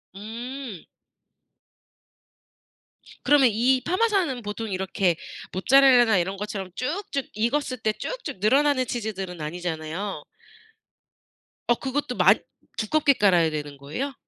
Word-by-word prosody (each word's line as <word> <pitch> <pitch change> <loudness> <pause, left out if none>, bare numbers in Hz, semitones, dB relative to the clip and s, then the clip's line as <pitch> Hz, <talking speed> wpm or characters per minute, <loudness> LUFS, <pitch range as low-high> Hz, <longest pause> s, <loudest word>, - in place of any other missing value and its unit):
음. 230 - -7 2.4
그러면 285 -4 +5
이 255 +4 +2
파마산은 370 - +1
보통 210 0 -5
이렇게 190 -2 0 0.4
모짜렐라나 245 0 +5
이런 190 +3 -1
것처럼 200 -2 -5
쭉쭉 285 - -3
익었을 255 +4 -1
때 220 -2 0
쭉쭉 - - -6
늘어나는 265 +5 +3
치즈들은 195 -7 -4
아니잖아요. 170 +4 -4 1.4
어 240 - +4
그것도 265 0 -3
많이 - - +5 0.4
두껍게 280 +6 +3
깔아야 180 -8 +3
되는 150 -2 -5
거예요? 155 - -5
225 Hz, 260 characters per minute, -25 LUFS, 190-270 Hz, 2.4 s, 그러면